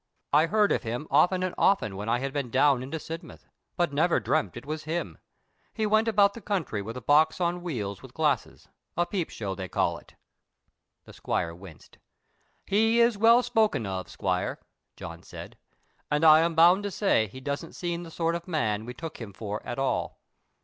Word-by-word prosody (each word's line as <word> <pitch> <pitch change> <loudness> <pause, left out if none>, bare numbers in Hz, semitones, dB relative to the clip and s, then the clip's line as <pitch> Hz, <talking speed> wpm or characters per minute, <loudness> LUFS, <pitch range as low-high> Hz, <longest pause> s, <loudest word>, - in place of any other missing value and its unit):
I 155 +3 +5
heard 210 +3 +3
of - - +1
him 120 +5 -4
often 180 +6 +3
and 185 - -2
often 110 - +2
when 105 +3 -5
I 120 - +2
had 135 +2 -4
been 140 -4 -2
down 135 0 +3
into 135 +5 -5
Sidmouth, 165 +1 -9 0.3
but 175 -4 +1
never 160 +4 +2
dreamt 100 +1 -1
it 120 - -9
was 155 +1 -5
him. 165 +2 -4 0.6
He 220 - 0
went 215 +2 +3
about 200 -2 +4
the 230 - -10
country 175 - -2
with 115 +4 -7
a - - -6
box 155 +7 +3
on 175 0 0
wheels 110 - -4
with 130 -2 -14
glasses—a 155 +3 -2
peep 180 -3 -3
show 100 -3 -4
they 95 -1 -6
call - - 0
it." - - -22 0.9
The - - -13
squire 85 -1 -2
winced. 85 -2 -14 0.7
"He 225 +3 +3
is 235 -1 +4
well 230 +4 +5
spoken 220 - +1
of, 95 -1 -4
squire," 90 -2 -2 0.4
John - - -9
said, - - -10 0.5
"and 150 +2 +1
I 155 0 +9
am 165 0 +1
bound 175 +4 +6
to 205 - -3
say 190 - +1
he 130 - -11
doesn't 140 +5 -5
seem 175 -1 -3
the 170 - -9
sort 165 0 -1
of 170 +1 -5
man 110 - -1
we 125 - -7
took 160 -1 -8
him 105 -3 -8
for 105 +1 -5
at 120 - -5
all. 135 0 -1
155 Hz, 195 wpm, -27 LUFS, 120-180 Hz, 0.9 s, I